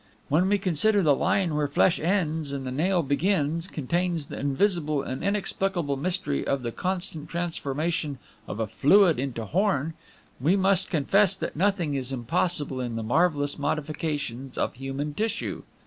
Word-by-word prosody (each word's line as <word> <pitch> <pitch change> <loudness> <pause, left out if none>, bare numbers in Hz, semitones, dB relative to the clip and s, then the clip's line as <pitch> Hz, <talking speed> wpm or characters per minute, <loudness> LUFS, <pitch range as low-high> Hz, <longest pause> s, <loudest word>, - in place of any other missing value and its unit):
"When 175 +6 +3
we 205 - +3
consider 200 +2 +2
the 150 -3 +5
line 180 0 +1
where 150 -1 +1
flesh 160 +5 +3
ends 160 -4 0
and 135 -1 -4
the 130 - -3
nail 175 +6 +1
begins 165 +2 0
contains 170 +1 -1
the - - -7
invisible 150 0 +1
and 130 -1 -5
inexplicable 195 -6 0
mystery 155 - -1
of 140 -2 -1
the 120 - -2
constant 175 -2 -3
transformation 160 -2 -2 0.3
of 105 - -5
a 110 - +1
fluid 165 - +4
into 125 -4 -3
horn, 165 - 0 0.5
we 155 +9 +3
must 190 -1 +2
confess 195 +5 +3
that - - -4
nothing 180 -3 +1
is 135 -1 -2
impossible 140 +1 0
in 120 -2 -3
the 115 - -3
marvelous 145 +3 +1
modifications 145 -4 -3
of - - 0
human 135 +3 -4
tissue. 220 +6 -2
155 Hz, 155 wpm, -26 LUFS, 140-185 Hz, 0.5 s, the